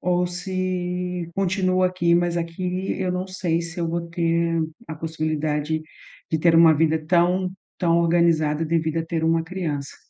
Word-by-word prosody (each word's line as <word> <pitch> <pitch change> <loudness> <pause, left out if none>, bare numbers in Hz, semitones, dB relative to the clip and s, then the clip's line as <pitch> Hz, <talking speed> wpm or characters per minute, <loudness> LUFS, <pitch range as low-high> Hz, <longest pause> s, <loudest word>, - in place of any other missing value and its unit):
ou 180 0 +1
se 180 -1 -3
continuo 185 -1 +1
aqui, 175 -2 +2
mas 175 0 +1
aqui 180 +2 -2
eu 185 -1 0
não 180 +1 -2
sei 185 -3 -1
se 170 +1 -8
eu 165 - -1
vou 170 0 -3
ter 170 0 +1 0.3
a 160 - -4
possibilidade 155 -1 -2 0.5
de 160 - +1
ter 165 +1 +4
uma 165 -1 +7
vida 160 +1 +2
tão 180 +2 +2 0.3
tão 170 -2 +2
organizada, 165 -2 +2
devido 160 0 0
a 165 - -1
ter 165 -1 -2
uma 165 0 +2
criança. 160 -6 -4
170 Hz, 160 wpm, -23 LUFS, 160-180 Hz, 0.5 s, uma